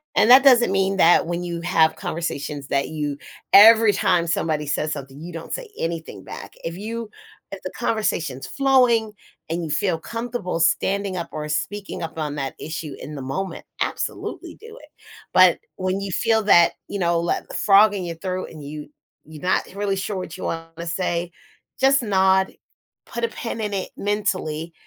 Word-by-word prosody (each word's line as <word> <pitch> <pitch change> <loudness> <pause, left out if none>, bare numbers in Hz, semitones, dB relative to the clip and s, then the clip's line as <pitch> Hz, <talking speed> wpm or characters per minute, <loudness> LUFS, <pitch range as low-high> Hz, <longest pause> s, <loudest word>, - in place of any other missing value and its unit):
And, 225 - +4
that 265 +2 +9
doesn't 245 -5 +6
mean 195 0 +1
that 170 -2 +5
when 175 +1 -2
you 170 -1 -4
have 165 -2 +3
conversations 145 -3 -4
that 140 0 +1
you 150 -2 -3 0.3
every 220 +1 +8
time 175 -3 +2
somebody 155 -2 -1
says 155 +1 -1
something, 140 -1 -8
you 170 +2 -8
don't 165 0 -7
say - - -4
anything 165 -1 -4
back, - - -9
if 165 +1 -5
you 225 +2 -5 0.4
if 195 - -7
the 185 - -5
conversation's 165 - -1
flowing 250 -5 +3 0.4
and 170 +2 -2
you - - -6
feel 170 +2 0
comfortable 230 -4 -4
standing 195 +3 +1
up 170 - -4
or 150 0 -5
speaking 200 +5 -3
up 160 0 -6
on 150 -2 -3
that 135 -2 -4
issue 155 -2 -5
in 150 - -7
the 140 - -6
moment, 185 +9 -4 0.2
absolutely - - -4
do 450 +1 -12
it, - - -16 0.4
but - - +6 0.2
when 185 +1 -1
you 200 -1 -4
feel 225 +4 +2
that, 175 -4 +6 0.2
you 200 - -4
know, 170 -1 +1
that - - -2
frog 205 +1 +5
in 190 -3 -3
your 170 -1 -5
throat, 185 +2 -4
and 155 -2 -10
you 150 +1 -7 0.4
you 155 0 -11
not 185 +4 +1
really 200 -1 -1
sure 195 +1 -3
what 180 -3 -6
you - - -8
want 165 0 -5
to 170 0 -6
say, 170 0 -1 0.5
just 270 0 +4
nod, 190 -2 +3 0.5
put 235 0 -6
a - - +3
pin 230 0 -5
in 210 -1 -2
it, 190 - -3
mentally, 185 -6 -2
180 Hz, 185 wpm, -22 LUFS, 160-205 Hz, 0.5 s, that